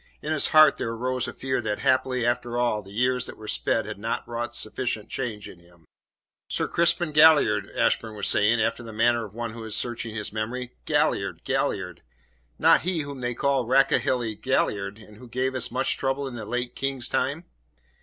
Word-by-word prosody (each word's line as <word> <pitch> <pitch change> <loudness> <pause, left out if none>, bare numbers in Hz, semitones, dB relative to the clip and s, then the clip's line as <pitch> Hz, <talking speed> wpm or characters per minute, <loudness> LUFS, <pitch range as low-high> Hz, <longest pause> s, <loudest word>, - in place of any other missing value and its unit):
In 155 - -1
his 155 - +3
heart 155 -2 +6
there - - -3
arose 125 +2 -2
a - - -6
fear 130 -1 -2
that, 105 -2 -2
haply 130 -2 +1
after 120 0 -1
all, 120 -3 +1
the 95 - -15
years 125 +4 0
that - - -9
were 110 - -10
sped 110 0 0
had 105 -1 -7
not 115 +2 -3
wrought 120 0 -4
sufficient 110 -1 -2
change 110 -5 -4
in 90 - -13
him. 85 -1 -22 0.6
"Sir - - -1
Crispin 170 -1 +2
Galliard," 155 +1 +5
Ashburn 110 -1 +1
was 100 - -1
saying, 110 +3 +3
after 115 +2 0
the 115 -1 -9
manner 115 +1 +2
of 105 0 -13
one 120 -1 -4
who 115 0 -8
is 110 -2 -4
searching 115 -2 -2
his 105 -1 -4
memory. 120 +3 -4
"Galliard, - - 0
Galliard 90 -1 -2 0.6
not - - +5
he 175 -2 -1
whom 140 -2 -7
they 120 -1 -2
called 135 -3 +1
'Rakehelly 130 -3 +2
Galliard,' 100 -6 0
and 105 -1 -15
who 125 +2 -12
gave 130 +2 -1
us 130 - -1
such 125 - 0
trouble 135 +1 -1
in 130 - -7
the 110 -2 -6
late 125 +3 -3
King's 135 -2 -1
time?" 145 +7 -1
120 Hz, 195 wpm, -25 LUFS, 110-130 Hz, 0.6 s, heart